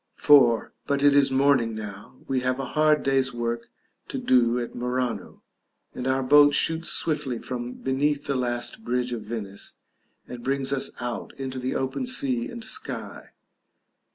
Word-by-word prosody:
§ 150 Hz, -2 st, +5 dB, 0.3 s
IV. -, -, -20 dB, 0.2 s
But 140 Hz, 0 st, 0 dB
it 145 Hz, -1 st, +6 dB
is 140 Hz, -1 st, +5 dB
morning 130 Hz, -4 st, +2 dB
now: 105 Hz, +1 st, -8 dB
we 135 Hz, -1 st, 0 dB
have 130 Hz, +1 st, -1 dB
a 135 Hz, -, -2 dB
hard 155 Hz, -1 st, +3 dB
day's 135 Hz, -1 st, +2 dB
work 120 Hz, 0 st, -3 dB, 0.4 s
to -, -, -5 dB
do 125 Hz, -1 st, +3 dB
at 120 Hz, -, -5 dB
Murano, 125 Hz, 0 st, -3 dB, 0.5 s
and 125 Hz, -, -4 dB
our 130 Hz, 0 st, +1 dB
boat 145 Hz, +2 st, +6 dB
shoots 165 Hz, +1 st, +1 dB
swiftly 145 Hz, -6 st, 0 dB
from 120 Hz, 0 st, -5 dB
beneath 145 Hz, +2 st, -1 dB
the 140 Hz, -, 0 dB
last 125 Hz, -, -2 dB
bridge 125 Hz, -, -1 dB
of 115 Hz, -, -4 dB
Venice, 105 Hz, -2 st, -7 dB, 0.5 s
and 120 Hz, -1 st, -9 dB
brings 135 Hz, +1 st, -1 dB
us 135 Hz, -, -2 dB
out 120 Hz, 0 st, -5 dB
into 130 Hz, -1 st, -5 dB
the 125 Hz, +1 st, -3 dB
open 135 Hz, -, -2 dB
sea 130 Hz, -, +1 dB
and 235 Hz, -1 st, -7 dB
sky. 220 Hz, -, -4 dB
130 Hz, 165 wpm, -25 LUFS, 120-140 Hz, 0.5 s, it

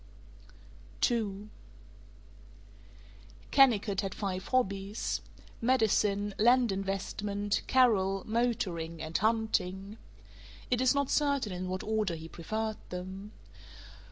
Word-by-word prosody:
II 210 Hz, -3 st, -2 dB, 2.0 s
Kennicott 220 Hz, -7 st, +4 dB
had 195 Hz, -2 st, -4 dB
five 190 Hz, -2 st, -3 dB
hobbies: 200 Hz, -4 st, -1 dB, 0.4 s
medicine, 210 Hz, -4 st, +2 dB
land 240 Hz, +1 st, +5 dB
investment, 200 Hz, +1 st, -2 dB
Carol, 195 Hz, -7 st, +3 dB
motoring, 190 Hz, -8 st, -1 dB
and 160 Hz, +1 st, -6 dB
hunting. 215 Hz, -2 st, 0 dB, 0.7 s
It 250 Hz, 0 st, +2 dB
is 260 Hz, +2 st, +4 dB
not 280 Hz, -1 st, 0 dB
certain 280 Hz, -7 st, +1 dB
in 180 Hz, 0 st, -4 dB
what 185 Hz, 0 st, -3 dB
order 215 Hz, -5 st, 0 dB
he 160 Hz, 0 st, -8 dB
preferred 215 Hz, +7 st, -3 dB
them. 190 Hz, +3 st, -7 dB
205 Hz, 95 wpm, -31 LUFS, 190-230 Hz, 2.0 s, land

